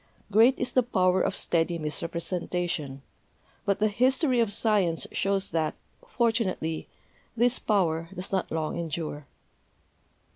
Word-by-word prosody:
Great 230 +6 +5
is 250 -1 -2
the 255 - +4
power 185 -6 +2
of - - 0
steady 170 0 +1
misrepresentation; 165 -2 -3 0.6
but 200 0 +2
the 215 +1 +2
history 255 +4 +2
of 225 -3 +2
science 200 -6 +1
shows 195 0 0
that, 160 -2 0 0.3
fortunately, 225 - -1 0.5
this 240 +2 +3
power 165 -6 +1
does 185 0 -5
not 190 -2 -1
long 160 +1 -2
endure." 155 -3 -4
185 Hz, 120 wpm, -27 LUFS, 165-225 Hz, 0.6 s, Great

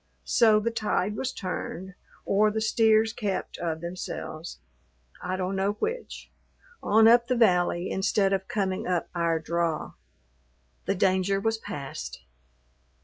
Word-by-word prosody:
So 220 -3 +5
the 230 +2 -1
tide 210 -3 -1
was 260 +4 -2
turned, 185 0 -5 0.3
or 210 +2 +3
the 215 +1 -2
steers 220 0 +3
kept 200 -4 -3
of 160 -2 -3
themselves, 170 -1 -6 0.6
I 185 - -2
don't 185 +1 -2
know 195 +1 +1
which, 460 - -5 0.5
on 220 +2 +5
up 235 +1 +6
the 255 - +1
valley 180 -5 +2
instead 195 0 +1
of 190 0 -1
coming 195 -5 -2
up 180 -2 -1
our 170 -1 +1
draw. 165 0 -2 0.9
The 195 - 0
danger 190 +1 +2
was 225 +2 -1
past. 140 -9 -7
195 Hz, 135 wpm, -27 LUFS, 180-220 Hz, 0.9 s, up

